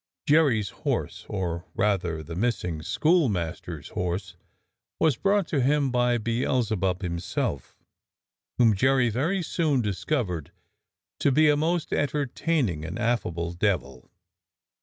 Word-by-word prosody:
Jerry's 145 Hz, -, +3 dB
horse, -, -, -3 dB
or, 90 Hz, -3 st, -3 dB
rather, 90 Hz, -6 st, 0 dB
the 85 Hz, -, -8 dB
missing 90 Hz, -5 st, -1 dB
schoolmaster's 120 Hz, -, 0 dB
horse, 90 Hz, 0 st, -3 dB, 0.6 s
was 160 Hz, -5 st, +3 dB
brought 200 Hz, -, +2 dB
to 140 Hz, -, +1 dB
him 140 Hz, +1 st, +2 dB
by 125 Hz, -1 st, +2 dB
Beelzebub 110 Hz, -5 st, 0 dB
himself, 85 Hz, -6 st, -3 dB, 0.8 s
whom 115 Hz, -3 st, +5 dB
Jerry 130 Hz, +2 st, +3 dB
very 165 Hz, -, 0 dB
soon 155 Hz, -4 st, +1 dB
discovered 100 Hz, -, -2 dB, 0.7 s
to 140 Hz, -, +3 dB
be 155 Hz, +3 st, +5 dB
a 150 Hz, -, +5 dB
most 160 Hz, +3 st, 0 dB
entertaining 140 Hz, -, 0 dB
and 85 Hz, +6 st, -5 dB
affable 90 Hz, -8 st, -1 dB
devil. 85 Hz, -9 st, -2 dB
115 Hz, 115 wpm, -26 LUFS, 90-145 Hz, 0.8 s, whom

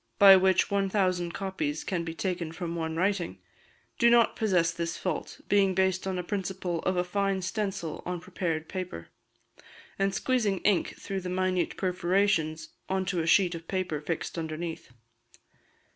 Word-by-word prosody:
(by 195 Hz, -1 st, +10 dB
which 190 Hz, 0 st, +3 dB
1,000 190 Hz, -3 st, +1 dB
copies 165 Hz, -6 st, -3 dB
can 175 Hz, -3 st, -2 dB
be 165 Hz, 0 st, -5 dB
taken 175 Hz, -3 st, -2 dB
from 170 Hz, 0 st, -5 dB
one 160 Hz, -1 st, -3 dB
writing), 180 Hz, -, 0 dB, 0.6 s
do 235 Hz, -, +6 dB
not 235 Hz, -1 st, +5 dB
possess 180 Hz, -6 st, +2 dB
this 170 Hz, 0 st, -3 dB
fault, 180 Hz, -5 st, -4 dB
being 195 Hz, -2 st, +3 dB
based 190 Hz, 0 st, +1 dB
on 190 Hz, -1 st, -1 dB
a 180 Hz, -, -2 dB
principle 185 Hz, -2 st, -3 dB
of 185 Hz, -, +1 dB
a 180 Hz, -, +2 dB
fine 195 Hz, +1 st, 0 dB
stencil 190 Hz, -4 st, -3 dB
on 180 Hz, 0 st, -3 dB
prepared 165 Hz, -3 st, -3 dB
paper, 180 Hz, -, -6 dB, 0.9 s
and 195 Hz, 0 st, +1 dB
squeezing 220 Hz, -6 st, +1 dB
ink 205 Hz, -4 st, +1 dB
through 195 Hz, -1 st, -4 dB
the 180 Hz, -, -5 dB
minute 185 Hz, -1 st, 0 dB
perforations 180 Hz, -3 st, +1 dB, 0.2 s
on 190 Hz, 0 st, 0 dB
to 185 Hz, -3 st, 0 dB
a 160 Hz, -, -3 dB
sheet 180 Hz, 0 st, +4 dB
of 165 Hz, 0 st, -8 dB
paper 180 Hz, -6 st, -2 dB
fixed 165 Hz, +2 st, -3 dB
underneath. 160 Hz, -2 st, -5 dB
185 Hz, 160 wpm, -28 LUFS, 170-195 Hz, 0.9 s, by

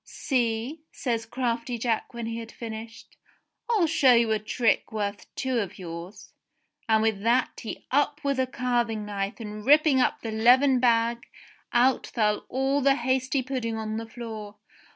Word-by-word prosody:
"See," 245 Hz, +3 st, -2 dB
says 230 Hz, -3 st, -2 dB
crafty 240 Hz, 0 st, -2 dB
Jack 230 Hz, -1 st, -1 dB
when 235 Hz, -2 st, -5 dB
he 230 Hz, 0 st, -4 dB
had 230 Hz, 0 st, -8 dB
finished. 225 Hz, 0 st, -9 dB, 0.5 s
"I'll 430 Hz, -7 st, +3 dB
show 280 Hz, -6 st, +5 dB
you 230 Hz, -1 st, +3 dB
a 215 Hz, -, +2 dB
trick 220 Hz, +1 st, 0 dB
worth 205 Hz, -2 st, -3 dB
two 260 Hz, -2 st, 0 dB
of 200 Hz, -4 st, -4 dB
yours," 175 Hz, +2 st, -9 dB, 0.6 s
and 220 Hz, 0 st, +4 dB
with 220 Hz, -3 st, 0 dB
that 240 Hz, +4 st, +1 dB
he 220 Hz, -, -7 dB
up 290 Hz, +2 st, +2 dB
with 280 Hz, -2 st, 0 dB
a 260 Hz, -, +2 dB
carving 240 Hz, -4 st, -1 dB
knife 200 Hz, +2 st, -4 dB
and 210 Hz, -1 st, -7 dB
ripping 295 Hz, 0 st, +5 dB
up -, -, +1 dB
the 225 Hz, -, -3 dB
leathern 250 Hz, +4 st, +5 dB
bag 235 Hz, -1 st, +2 dB, 0.4 s
out 250 Hz, +2 st, +3 dB
fell 210 Hz, -3 st, 0 dB
all 270 Hz, +2 st, +1 dB
the 275 Hz, 0 st, +4 dB
hasty 260 Hz, +1 st, 0 dB
pudding 245 Hz, -4 st, -3 dB
on 220 Hz, 0 st, -3 dB
the 225 Hz, 0 st, -5 dB
floor 220 Hz, -3 st, -8 dB
235 Hz, 165 wpm, -26 LUFS, 220-260 Hz, 0.6 s, show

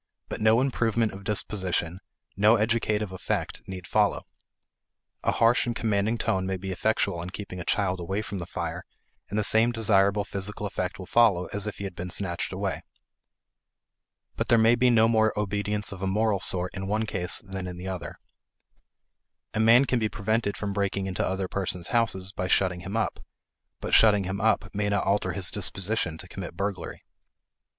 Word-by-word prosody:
But -, -, -5 dB
no 110 Hz, +2 st, +5 dB
improvement 115 Hz, -4 st, +1 dB
of 95 Hz, +1 st, -10 dB
disposition, 95 Hz, -4 st, -2 dB, 0.4 s
no 105 Hz, +3 st, +5 dB
educative 110 Hz, -2 st, 0 dB
effect, 95 Hz, -, -3 dB
need 95 Hz, -2 st, -7 dB
follow. -, -, +1 dB, 1.0 s
A -, -, +2 dB
harsh 120 Hz, +2 st, +3 dB
and 120 Hz, -, -1 dB
commanding 110 Hz, 0 st, 0 dB
tone 95 Hz, -4 st, 0 dB
may 95 Hz, 0 st, -1 dB
be 95 Hz, +1 st, -5 dB
effectual 100 Hz, -2 st, 0 dB
in 90 Hz, -, -6 dB
keeping 95 Hz, -1 st, -7 dB
a -, -, -4 dB
child 95 Hz, 0 st, 0 dB
away 95 Hz, +5 st, -2 dB
from 100 Hz, -2 st, -5 dB
the 85 Hz, -, -6 dB
fire, -, -, -4 dB, 0.5 s
and 105 Hz, -, -3 dB
the 105 Hz, -, +2 dB
same 110 Hz, +3 st, +5 dB
desirable 100 Hz, -3 st, +2 dB
physical 105 Hz, +1 st, -1 dB
effect 95 Hz, -2 st, -3 dB
will 95 Hz, -, -8 dB
follow 100 Hz, -5 st, +3 dB
as 105 Hz, +1 st, 0 dB
if 105 Hz, -, -5 dB
he -, -, -6 dB
had 95 Hz, -3 st, -5 dB
been 90 Hz, +1 st, -5 dB
snatched 85 Hz, -1 st, -2 dB
away. -, -, -3 dB, 1.5 s
But -, -, -2 dB
there 120 Hz, -, +5 dB
may 115 Hz, +1 st, +5 dB
be 125 Hz, +1 st, +3 dB
no 115 Hz, -2 st, +5 dB
more 110 Hz, -2 st, +2 dB
obedience 105 Hz, +1 st, -1 dB
of 95 Hz, -2 st, -8 dB
a 95 Hz, -, -1 dB
moral 105 Hz, +1 st, +1 dB
sort 90 Hz, 0 st, +1 dB
in 95 Hz, 0 st, -5 dB
one 110 Hz, +2 st, 0 dB
case 95 Hz, -4 st, 0 dB
than 95 Hz, -1 st, -5 dB
in 90 Hz, -1 st, -7 dB
the 90 Hz, +2 st, -7 dB
other. 95 Hz, -2 st, -5 dB, 1.4 s
A -, -, -2 dB
man 115 Hz, +4 st, +6 dB
can 125 Hz, -2 st, +1 dB
be 110 Hz, -1 st, 0 dB
prevented 110 Hz, -1 st, -1 dB
from 100 Hz, -1 st, -3 dB
breaking 100 Hz, -1 st, -1 dB
into 95 Hz, -1 st, -2 dB
other 95 Hz, 0 st, -1 dB
persons' 90 Hz, -2 st, -2 dB
houses 95 Hz, -5 st, +1 dB
by 90 Hz, -2 st, -3 dB
shutting 90 Hz, -1 st, +2 dB
him 95 Hz, +5 st, -4 dB
up, 115 Hz, -, -1 dB, 0.6 s
but -, -, -5 dB
shutting 105 Hz, -3 st, +6 dB
him 95 Hz, +2 st, -3 dB
up 110 Hz, -3 st, +1 dB
may 105 Hz, 0 st, -1 dB
not 100 Hz, -2 st, +1 dB
alter 100 Hz, +1 st, +1 dB
his 95 Hz, -3 st, +2 dB
disposition 95 Hz, -2 st, -1 dB
to 90 Hz, -, -8 dB
commit 90 Hz, -2 st, -8 dB
burglary. 100 Hz, -1 st, -4 dB
100 Hz, 185 wpm, -27 LUFS, 95-110 Hz, 1.5 s, man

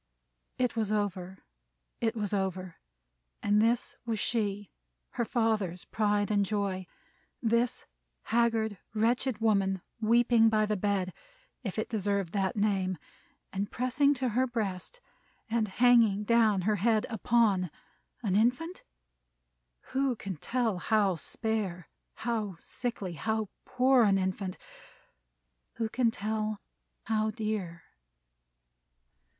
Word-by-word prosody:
It 250 Hz, -2 st, 0 dB
was 215 Hz, -2 st, 0 dB
over. 190 Hz, -3 st, -2 dB, 0.6 s
It 230 Hz, 0 st, 0 dB
was 210 Hz, -2 st, -2 dB
over. 185 Hz, -3 st, -2 dB, 0.7 s
And 205 Hz, +1 st, +4 dB
this 230 Hz, +2 st, +1 dB
was 230 Hz, -2 st, -2 dB
she, 205 Hz, -2 st, -1 dB, 0.4 s
her 240 Hz, -, -1 dB
father's 215 Hz, -7 st, 0 dB
pride 205 Hz, -1 st, +1 dB
and 205 Hz, -1 st, +3 dB
joy! 195 Hz, -2 st, -2 dB, 0.5 s
This 235 Hz, 0 st, +1 dB, 0.4 s
haggard, 225 Hz, -3 st, +1 dB, 0.2 s
wretched 235 Hz, +2 st, +1 dB
woman, 195 Hz, -4 st, +1 dB, 0.2 s
weeping 230 Hz, 0 st, +4 dB
by 215 Hz, -1 st, +3 dB
the 210 Hz, 0 st, 0 dB
bed, 195 Hz, -2 st, 0 dB, 0.5 s
if 195 Hz, -4 st, -4 dB
it 220 Hz, -, -1 dB
deserved 200 Hz, -4 st, -1 dB
that 195 Hz, -2 st, 0 dB
name, 195 Hz, -3 st, +1 dB, 0.6 s
and 200 Hz, +1 st, -2 dB
pressing 280 Hz, +3 st, +2 dB
to 255 Hz, -1 st, -1 dB
her 255 Hz, +4 st, +1 dB
breast, 225 Hz, -, -4 dB, 0.5 s
and 225 Hz, -2 st, +1 dB
hanging 225 Hz, -1 st, +4 dB
down 220 Hz, -3 st, +3 dB
her 210 Hz, +3 st, +1 dB
head 220 Hz, +2 st, +2 dB
upon, 220 Hz, -5 st, +2 dB, 0.5 s
an 195 Hz, -4 st, +1 dB
infant? 250 Hz, -, +1 dB, 1.1 s
Who 265 Hz, -1 st, +1 dB
can 200 Hz, -4 st, -5 dB
tell 230 Hz, -, -1 dB
how 205 Hz, -1 st, +2 dB
spare, 195 Hz, -1 st, -3 dB, 0.3 s
how 220 Hz, -5 st, -2 dB
sickly, 205 Hz, -1 st, -4 dB
and 165 Hz, -, -9 dB
how 220 Hz, -2 st, -1 dB, 0.2 s
poor 255 Hz, 0 st, +4 dB
an 195 Hz, -1 st, +4 dB
infant? 190 Hz, 0 st, -2 dB, 1.2 s
Who 225 Hz, -1 st, -2 dB
can 240 Hz, 0 st, +2 dB
tell 215 Hz, -1 st, -2 dB, 0.4 s
how 220 Hz, -1 st, +1 dB
dear? 210 Hz, -6 st, -3 dB
215 Hz, 120 wpm, -30 LUFS, 195-235 Hz, 1.2 s, And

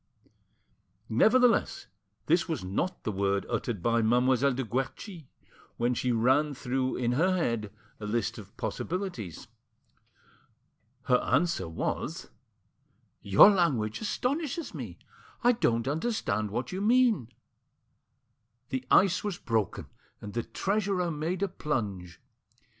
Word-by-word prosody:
Nevertheless, 230 Hz, -, +3 dB, 0.4 s
this 170 Hz, +3 st, +2 dB
was 160 Hz, -, -2 dB
not 170 Hz, -, -3 dB
the 110 Hz, -, -1 dB
word 100 Hz, 0 st, 0 dB
uttered 105 Hz, -8 st, -3 dB
by 115 Hz, 0 st, +2 dB
Mademoiselle 125 Hz, +4 st, +3 dB
de 135 Hz, -, -2 dB
Guerchi 135 Hz, -, -4 dB, 0.5 s
while 120 Hz, +1 st, +1 dB
she 125 Hz, +1 st, -1 dB
ran 130 Hz, +6 st, +2 dB
through 130 Hz, 0 st, -1 dB
in 120 Hz, -1 st, 0 dB
her 180 Hz, +8 st, +2 dB
head 115 Hz, -, -1 dB, 0.3 s
a 105 Hz, -, -5 dB
list 115 Hz, +1 st, -1 dB
of 100 Hz, -1 st, -14 dB
possibilities. 165 Hz, -, -4 dB, 1.6 s
Her 125 Hz, -, +4 dB
answer 165 Hz, -, 0 dB
was— 80 Hz, -, -4 dB, 0.9 s
"Your 100 Hz, -, +7 dB
language 135 Hz, -, 0 dB
astonishes 285 Hz, +8 st, -2 dB
me; -, -, -7 dB, 0.5 s
I 245 Hz, -, +6 dB
don't 120 Hz, -, 0 dB
understand 140 Hz, -, -1 dB
what 120 Hz, +4 st, -3 dB
you 185 Hz, +1 st, -3 dB
mean." 225 Hz, -, +3 dB, 1.4 s
The 130 Hz, -3 st, -2 dB
ice 190 Hz, -1 st, +4 dB
was 205 Hz, -4 st, -3 dB
broken, 110 Hz, -, -1 dB, 0.3 s
and 105 Hz, -1 st, -8 dB
the 120 Hz, -, 0 dB
treasurer 195 Hz, -, -1 dB
made 165 Hz, +5 st, -2 dB
a -, -, +2 dB
plunge. 100 Hz, -, -4 dB
130 Hz, 120 wpm, -29 LUFS, 110-185 Hz, 1.6 s, Your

